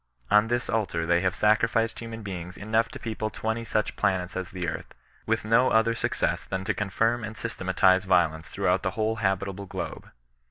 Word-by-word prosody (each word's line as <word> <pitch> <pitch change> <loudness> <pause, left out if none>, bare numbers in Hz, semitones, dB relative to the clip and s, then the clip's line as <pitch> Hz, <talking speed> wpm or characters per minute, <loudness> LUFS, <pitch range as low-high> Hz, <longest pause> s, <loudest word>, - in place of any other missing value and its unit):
" - - -29
On 105 +1 +4
this 120 +1 -1
altar 100 -7 -1
they 85 +1 +3
have 95 -1 0
sacrificed 115 +1 +2
human 115 -1 -7
beings 90 -3 -6
enough 110 +2 +1
to - - -8
people 110 -1 -3
twenty 110 +2 -3
such 110 -1 -1
planets 90 -1 0
as 95 -1 -3
the 90 -2 -4
earth, - - -5 0.3
with - - 0
no 115 +4 +4
other 110 +1 +3
success 115 - -1
than 95 0 -4
to - - 0
confirm 115 +4 0
and 110 0 -6
systematize 95 -3 +2
violence 80 -5 +2
throughout 90 +1 +1
the 95 - -1
whole 110 +1 0
habitable 100 -1 -1
globe. - - -6
105 Hz, 190 wpm, -27 LUFS, 95-115 Hz, 0.3 s, On